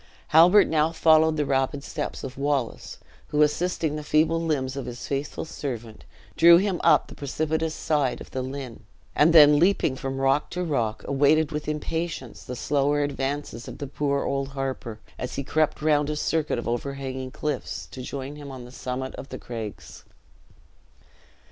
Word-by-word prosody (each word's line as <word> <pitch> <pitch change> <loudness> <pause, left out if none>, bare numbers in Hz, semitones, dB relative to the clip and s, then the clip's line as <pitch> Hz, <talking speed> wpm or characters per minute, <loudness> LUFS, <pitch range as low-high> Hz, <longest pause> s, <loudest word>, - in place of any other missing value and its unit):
Halbert 175 +6 +7
now 155 0 +1
followed 160 -1 +4
the 150 - +1
rapid 135 +1 0
steps 150 0 -5
of 130 -1 -6
Wallace, 140 -3 -2 0.3
who, 150 0 +3
assisting 160 0 0
the 150 - -5
feeble 160 +2 +2
limbs 135 -5 -1
of 135 -3 -5
his 120 0 -7
faithful 140 +3 -3
servant, 120 -8 -6 0.3
drew 170 0 +8
him 190 -1 0
up 160 -2 +5
the - - -12
precipitous 155 +3 -2
side 145 -5 0
of - - -11
the 130 - -3
Lynn, 130 -2 -6 0.4
and 150 +3 +5
then 150 -2 +8
leaping 175 -6 +2
from 135 0 -4
rock 135 +2 +2
to 180 +1 -3
rock, 120 -10 -1
awaited 145 +3 +3
with 150 -1 -4
impatience 150 -3 -4
the 125 - -6
slower 145 +2 +1
advances 140 -3 -3
of - - -8
the 145 - -5
poor 140 0 -1
old 135 0 -1
harper, 130 -5 -4 0.2
as 125 - -4
he 140 - -3
crept 155 +2 0
round 150 -1 +2
a 150 - -1
circuit 155 -1 0
of 120 - -4
overhanging 130 +1 -3
cliffs, 150 +3 -4
to 130 - -7
join 140 +3 -6
him 145 -1 -9
on 130 -2 -8
the 125 - -12
summit 130 0 -5
of 135 - -8
the - - -6
craigs. 110 -4 -8
145 Hz, 175 wpm, -25 LUFS, 130-155 Hz, 0.4 s, drew